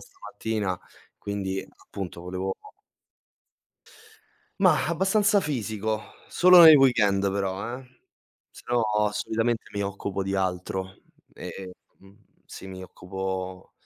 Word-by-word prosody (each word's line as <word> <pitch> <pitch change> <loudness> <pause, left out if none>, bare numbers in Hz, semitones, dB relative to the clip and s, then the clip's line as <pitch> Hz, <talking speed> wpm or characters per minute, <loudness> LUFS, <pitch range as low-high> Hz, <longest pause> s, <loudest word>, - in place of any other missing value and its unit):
stamattina, 105 -3 -4 0.4
quindi 95 -1 -4
appunto 90 -3 -8
volevo 95 +2 -4 2.1
Mah, - - +4
abbastanza 200 +4 +2
fisico, 110 - -2 0.3
solo 180 0 +7
nel 160 -2 +10
weekend 100 -8 +3
però, 100 +5 -3
eh, 130 -1 -19 0.5
se - - -15
no 120 -1 +2 0.3
solitamente 110 +2 -1
mi 100 - -3
occupo 100 0 -3
di 95 +1 -3
altro 95 0 -3 0.3
e 95 -1 -8 0.3
mhmm, 95 0 -19 0.3
sì, - - -11
mi 95 -1 -8
occupo 95 0 -6
100 Hz, 105 wpm, -26 LUFS, 95-120 Hz, 2.1 s, nel